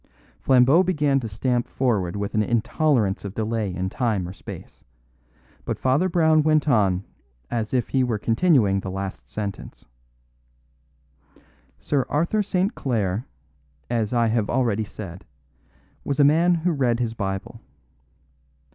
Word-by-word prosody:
Flambeau 135 +6 +5
began 150 -7 +1
to 115 -4 -5
stamp 120 +3 -1
forward 105 -9 -1
with 100 0 -3
an 110 - +2
intolerance 115 - +1
of 100 0 -7
delay 110 -2 -1
in 90 +1 -3
time 105 -4 -1
or 90 - -7
space; 95 - -11 0.8
but - - -3
Father 140 +9 +1
Brown 160 -3 +4
went 155 0 +2
on 100 -8 +2 0.5
as 115 -3 -2
if 125 -2 0
he 130 -1 +2
were 120 -3 0
continuing 115 - +2
the 95 - -6
last 95 0 -6
sentence: 100 -2 -6 1.9
"Sir 135 -4 -1
Arthur 170 +8 +1
St. 190 +1 0
Clare, 110 -3 -2 0.6
as 115 -3 0
I 120 -2 +2
have 110 -2 0
already 115 -4 0
said, 95 -4 -9 0.8
was 140 0 -2
a - - +7
man 165 +5 +4
who 170 +2 0
read 125 -6 +1
his 115 -2 -1
Bible. 95 -3 -5
120 Hz, 140 wpm, -23 LUFS, 100-145 Hz, 1.9 s, a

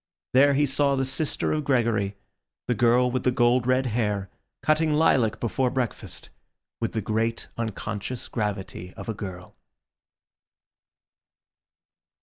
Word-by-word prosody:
There 140 +2 +6
he 145 +1 +3
saw 140 0 +2
the 135 0 0
sister 140 +3 0
of 155 -1 0
Gregory, 115 -7 +1 0.5
the 125 - +2
girl 120 +2 +3
with 130 0 0
the - - +3
gold 120 0 +3
red 130 +1 +3
hair, 105 -5 -1 0.3
cutting 155 +1 +3
lilac 135 -7 +3
before 125 +2 0
breakfast, 125 -2 -3 0.5
with 115 - -2
the 110 - -2
great 115 +2 -1
unconscious 110 +1 -4
gravity 95 -4 -4
of - - -9
a 110 - -1
girl. 95 -4 -8
120 Hz, 130 wpm, -25 LUFS, 110-130 Hz, 0.5 s, There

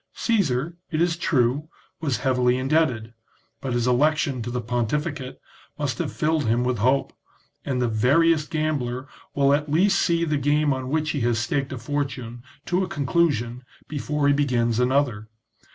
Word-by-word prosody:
Caesar, 170 - 0
it 155 - -2
is 170 0 +2
true, 145 -3 +1 0.3
was 145 -6 -1
heavily 125 -1 +2
indebted, 130 -5 0 0.5
but 130 -2 -3
his 120 -1 0
election 140 +1 +2
to 120 - -4
the 125 +1 -2
pontificate 130 +4 -2 0.4
must - - -2
have - - -2
filled 155 -1 0
him 115 +2 +2
with 125 -2 -1
hope, 130 +5 +1 0.5
and 130 -2 -2
the 125 - +1
veriest 150 +8 +3
gambler 140 -5 -2 0.3
will 140 0 +4
at 150 +1 0
least 190 +6 +3
see 170 0 +2
the 150 -2 0
game 145 +1 +2
on 130 -1 -4
which 155 +1 0
he 145 - -2
has 120 -1 +1
staked 135 +5 -1
a 130 - -4
fortune 125 -2 -4 0.2
to 180 +2 +1
a - - -2
conclusion 130 -5 0 0.2
before 150 0 -2
he 145 - +5
begins 120 -5 +1
another. 125 -4 +1
140 Hz, 165 wpm, -24 LUFS, 125-155 Hz, 0.5 s, he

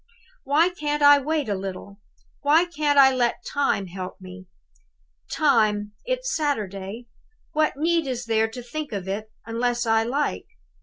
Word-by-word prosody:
"Why 300 +6 +3
can't 295 -4 -2
I 285 0 +8
wait 300 -1 -1
a 205 - 0
little? 195 +1 -7 0.4
Why 305 +4 +4
can't 300 -4 0
I 265 -1 +7
let 240 -2 0
Time 280 -8 0
help 185 0 -7
me? 185 0 -11 0.8
Time? 215 -7 +2
It's - - -2
Saturday! 215 - -3 0.5
What 310 -2 +1
need 330 0 +1
is 250 -2 -3
there 225 -1 +2
to 240 +2 -9
think 295 +2 -6
of 195 -2 -4
it, 215 +3 -4
unless 240 +1 -1
I 225 0 +3
like? 235 - -2
245 Hz, 150 wpm, -24 LUFS, 210-295 Hz, 0.8 s, I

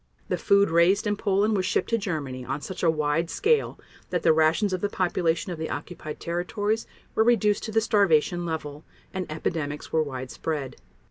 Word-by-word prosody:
The - - 0
food 200 -2 +4
raised 170 +5 +4
in 210 0 +1
Poland 205 +1 +1
was 190 - +1
shipped 185 - 0
to 230 - +3
Germany 145 -10 -4
on 130 +3 -3
such 185 +6 -6
a 170 - +4
wide 155 +1 0
scale 460 +1 +1 0.3
that 180 -2 -1
the 165 - +6
rations 160 +6 +2
of 185 - -2
the 205 - 0
population 175 -3 0
of 170 - -5
the 160 - -3
occupied 155 -4 -6
territories 180 +6 -2 0.3
were 220 - +3
reduced 215 -3 +3
to 220 - -5
the 225 +1 +3
starvation 175 -5 +3
level, 155 -3 -5 0.3
and 185 -4 -4
epidemics 155 -1 -3
were 160 - +4
widespread. 135 +1 -4
170 Hz, 185 wpm, -26 LUFS, 155-200 Hz, 0.3 s, the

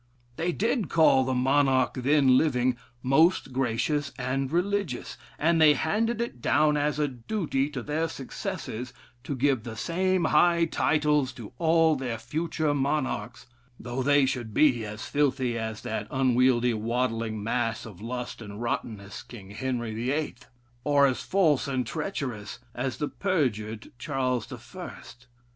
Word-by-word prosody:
They 170 +5 -1
did 220 +2 0
call 155 -5 +5
the 130 0 0
monarch 130 0 +3
then 135 0 +4
living, 130 -3 +2 0.3
'most 135 +1 +3
gracious 135 +3 0
and 130 +1 -2
religious,' 180 - -1 0.2
and 165 +1 +2
they 150 -2 +7
handed 220 +7 0
it 235 - -4
down 150 +3 +3
as 145 -1 0
a 150 -1 +1
duty 140 - -2
to 135 -5 -5
their 155 +4 -1
successors 125 -2 -5 0.3
to 140 - -3
give 130 -2 +2
the 110 0 -7
same 185 - 0
high 170 -1 +4
titles 150 -4 +1
to 120 -2 -10
all 165 -1 +4
their 125 -4 -3
future 155 +5 -1
monarchs, 135 -5 -2 0.3
though 120 +2 -4
they 145 +1 +4
should 120 -5 -3
be 130 -7 +4
as 105 +1 -6
filthy 135 -4 +1
as 110 -2 -4
that 110 -1 -4
unwieldy, 125 -2 +3
waddling 115 -1 -1
mass 115 0 -1
of 105 -5 -11
lust 125 +1 -5
and 105 -1 -8
rottenness, 110 -4 -4
King 110 -6 -12
Henry 120 0 -3
the 115 +3 -2
Eighth, 145 -4 -3 0.4
or 145 -1 +4
at 130 -2 +2
false 165 -9 +2
and 130 -2 -1
treacherous 120 - -4 0.2
as 125 0 -3
the 150 - -1
perjured 115 - -2
Charles 130 -5 -1
the - - -7
First. 120 +1 -11
130 Hz, 150 wpm, -27 LUFS, 120-150 Hz, 0.4 s, they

